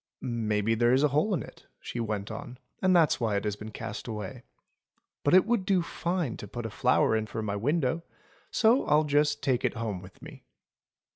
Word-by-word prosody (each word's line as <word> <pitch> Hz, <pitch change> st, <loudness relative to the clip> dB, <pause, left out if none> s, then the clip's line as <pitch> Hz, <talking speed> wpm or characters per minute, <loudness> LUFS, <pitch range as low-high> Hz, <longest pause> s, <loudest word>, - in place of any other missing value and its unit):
"Maybe 110 Hz, -3 st, 0 dB
there 120 Hz, +2 st, +3 dB
is 135 Hz, +3 st, +3 dB
a 150 Hz, -, +4 dB
hole 150 Hz, +10 st, +1 dB
in -, -, -3 dB
it," -, -, -15 dB
she 120 Hz, -, -6 dB
went 105 Hz, -2 st, -3 dB
on, 120 Hz, +3 st, -7 dB, 0.2 s
"and 185 Hz, -1 st, +4 dB
that's 165 Hz, -4 st, +4 dB
why 110 Hz, -4 st, 0 dB
it 100 Hz, -, 0 dB
has 105 Hz, -2 st, -1 dB
been 110 Hz, +1 st, -8 dB
cast 110 Hz, +1 st, -6 dB
away. 110 Hz, +2 st, -6 dB, 0.8 s
But 145 Hz, -, +4 dB
it 185 Hz, -, +6 dB
would 230 Hz, -3 st, +1 dB
do 185 Hz, -2 st, +2 dB
fine 170 Hz, -6 st, -2 dB
to 105 Hz, -, -8 dB
put 120 Hz, +3 st, -6 dB
a 110 Hz, -, -4 dB
flower 110 Hz, -, +3 dB
in 110 Hz, 0 st, -1 dB
for 110 Hz, -, -4 dB
my 100 Hz, -1 st, -2 dB
window; 145 Hz, +6 st, 0 dB, 0.5 s
so 235 Hz, +4 st, +4 dB
I'll 150 Hz, +1 st, +4 dB
just 145 Hz, 0 st, +1 dB
take 130 Hz, -3 st, +1 dB
it -, -, 0 dB
home 110 Hz, -5 st, -3 dB
with 95 Hz, 0 st, -14 dB
me." -, -, -12 dB
120 Hz, 210 wpm, -28 LUFS, 110-150 Hz, 0.8 s, it